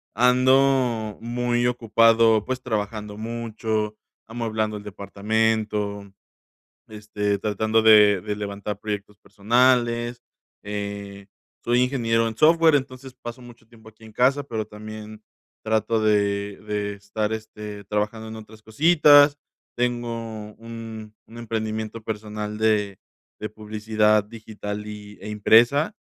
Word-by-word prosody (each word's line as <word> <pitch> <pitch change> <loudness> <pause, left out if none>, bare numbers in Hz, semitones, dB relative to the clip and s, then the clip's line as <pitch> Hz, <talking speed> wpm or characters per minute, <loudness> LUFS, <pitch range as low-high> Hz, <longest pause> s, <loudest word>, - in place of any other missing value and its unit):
ando 125 -2 +3
muy 120 0 -1
ocupado, 115 -2 +4
pues, 130 +1 -4
trabajando 105 -3 -4
mucho, 110 -1 -3 0.3
amueblando 110 -2 -2
el 105 - -10
departamento, 105 0 -2 0.8
este, 105 -1 -2
tratando 110 +2 +1
de 105 -3 +7
de 105 +1 -4
levantar 100 0 -5
proyectos 105 -1 -5
personales, 120 +3 +1 0.4
eh, 100 -1 -6 0.4
soy 120 +1 +2
ingeniero 115 -3 +1
en 110 - -7
software, 160 +1 +5
entonces, 130 -1 -3
paso 120 0 -9
mucho 120 -2 -15
tiempo 110 -1 -17
aquí 110 +1 -20
en 110 - -13
casa, 135 +5 +2
pero 110 -6 -4
también 110 0 -10 0.4
trato 110 +1 +1
de 100 -1 +1
de 105 -1 -2
estar, 105 +2 -3
este, 105 -2 -7
trabajando 105 +2 -3
en 110 - -8
otras 110 0 -13
cositas, 145 +3 +5 0.4
tengo 115 -3 -3
un 115 -2 -9
un 115 +1 -13
emprendimiento 110 -1 -4
personal 105 -1 -5
de 105 -3 +1 0.4
de 105 - -3
publicidad 110 0 +1
digital 105 -1 -7
y 105 -1 -9
e - - -8
impresa. 120 - +4
110 Hz, 115 wpm, -23 LUFS, 105-115 Hz, 0.8 s, de